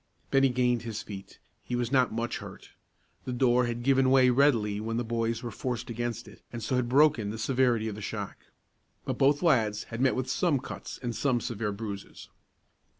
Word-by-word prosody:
Bennie 135 Hz, 0 st, +4 dB
gained 125 Hz, -1 st, +1 dB
his 115 Hz, -3 st, -5 dB
feet. 100 Hz, -2 st, -9 dB, 0.3 s
He 125 Hz, -, -3 dB
was 120 Hz, 0 st, -1 dB
not 130 Hz, -3 st, +3 dB
much 115 Hz, +1 st, -2 dB
hurt. -, -, -11 dB, 0.5 s
The 130 Hz, -, -3 dB
door 125 Hz, 0 st, +3 dB
had 120 Hz, 0 st, -4 dB
given 135 Hz, 0 st, +4 dB
way 130 Hz, -1 st, +5 dB
readily 120 Hz, -6 st, +3 dB
when 115 Hz, +1 st, -3 dB
the 120 Hz, -, 0 dB
boys 115 Hz, +1 st, -2 dB
were 120 Hz, -, -4 dB
forced 125 Hz, -1 st, -4 dB
against 120 Hz, +1 st, -4 dB
it, -, -, -15 dB
and 120 Hz, -1 st, -6 dB
so 130 Hz, -, -1 dB
had 125 Hz, -1 st, 0 dB
broken 135 Hz, -6 st, +4 dB
the 110 Hz, -, -5 dB
severity 120 Hz, -1 st, +1 dB
of 110 Hz, -, -3 dB
the 105 Hz, -, -8 dB
shock. -, -, -5 dB, 0.7 s
But -, -, -3 dB
both 145 Hz, +4 st, +3 dB
lads 110 Hz, -10 st, +2 dB
had 115 Hz, -, -3 dB
met 130 Hz, -1 st, +3 dB
with 130 Hz, 0 st, -2 dB
some 150 Hz, +3 st, +1 dB
cuts 130 Hz, -, -7 dB
and 120 Hz, -2 st, -2 dB
some 130 Hz, -4 st, +1 dB
severe 105 Hz, -1 st, -3 dB
bruises. 100 Hz, -1 st, -7 dB
120 Hz, 200 wpm, -28 LUFS, 115-130 Hz, 0.7 s, way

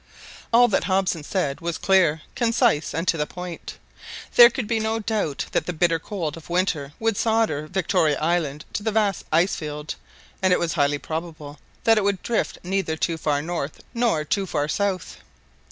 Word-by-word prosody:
All 245 Hz, +1 st, +6 dB
that 200 Hz, -, +1 dB
Hobson 185 Hz, -4 st, 0 dB
said 150 Hz, -5 st, -2 dB
was 170 Hz, 0 st, -2 dB
clear, 170 Hz, -5 st, +3 dB
concise, 230 Hz, -, +2 dB
and 165 Hz, +4 st, -3 dB
to 165 Hz, -, +2 dB
the 150 Hz, -1 st, -1 dB
point. 180 Hz, -1 st, -8 dB, 0.6 s
There 240 Hz, -1 st, +10 dB
could 245 Hz, 0 st, -4 dB
be 225 Hz, 0 st, 0 dB
no 220 Hz, +1 st, 0 dB
doubt 210 Hz, -9 st, -2 dB
that -, -, 0 dB
the 180 Hz, -, -2 dB
bitter 165 Hz, 0 st, +2 dB
cold 165 Hz, -4 st, -4 dB
of 165 Hz, 0 st, -13 dB
winter 170 Hz, -6 st, 0 dB
would 225 Hz, -1 st, +1 dB
solder 220 Hz, -10 st, +1 dB
Victoria 165 Hz, -4 st, +1 dB
Island 155 Hz, -2 st, -1 dB
to -, -, -2 dB
the 220 Hz, +1 st, -1 dB
vast 210 Hz, -3 st, 0 dB
ice 170 Hz, +5 st, +3 dB
field, 150 Hz, 0 st, -5 dB, 0.5 s
and 185 Hz, -1 st, +3 dB
it 180 Hz, -, +5 dB
was 170 Hz, -2 st, -1 dB
highly 145 Hz, -2 st, +2 dB
probable 155 Hz, -2 st, -6 dB, 0.2 s
that 225 Hz, -1 st, +5 dB
it -, -, -1 dB
would 200 Hz, -2 st, 0 dB
drift 235 Hz, -, -1 dB
neither 180 Hz, -3 st, -1 dB
too 165 Hz, 0 st, -1 dB
far 145 Hz, -2 st, 0 dB
north 165 Hz, -3 st, -4 dB
nor 230 Hz, -10 st, +1 dB
too 195 Hz, +3 st, -1 dB
far 145 Hz, -4 st, 0 dB
eouth. 190 Hz, +3 st, -2 dB
175 Hz, 185 wpm, -24 LUFS, 155-205 Hz, 0.6 s, There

